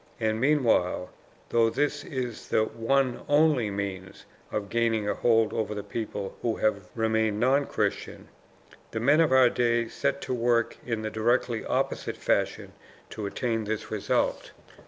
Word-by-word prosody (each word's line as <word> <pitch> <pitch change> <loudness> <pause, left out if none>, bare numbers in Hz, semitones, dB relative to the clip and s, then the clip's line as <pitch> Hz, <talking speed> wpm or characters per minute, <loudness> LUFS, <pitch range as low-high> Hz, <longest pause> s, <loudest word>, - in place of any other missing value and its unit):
And 110 0 0
meanwhile, 120 -11 +2 0.4
though 115 -1 +3
this 145 +4 -1
is 125 -4 -5
the 110 - +2
ONE 125 +3 0
ONLY 145 -6 +3
MEANS 100 -2 -5 0.3
of 105 -1 -2
gaining 115 -2 +1
a - - +1
hold 115 -2 +2
over 105 -2 -2
the 105 - -4
people 105 -2 -5
who 115 -2 0
have 100 -4 -1
remained 110 -2 +1
non 135 +4 +3
Christian, - - -3 0.6
the 110 - -4
men 145 +7 +4
of 160 - +3
our 130 -1 +7
day 120 -1 +1
set 140 +3 -1
to - - -3
work 120 -1 +1
in 115 -3 -3
the 110 - -3
directly 115 +1 0
opposite - - -2
fashion - - -1 0.4
to 105 -2 -4
attain 115 +1 -2
this 110 +1 -4
result. 105 -2 -1
115 Hz, 155 wpm, -27 LUFS, 110-125 Hz, 0.6 s, our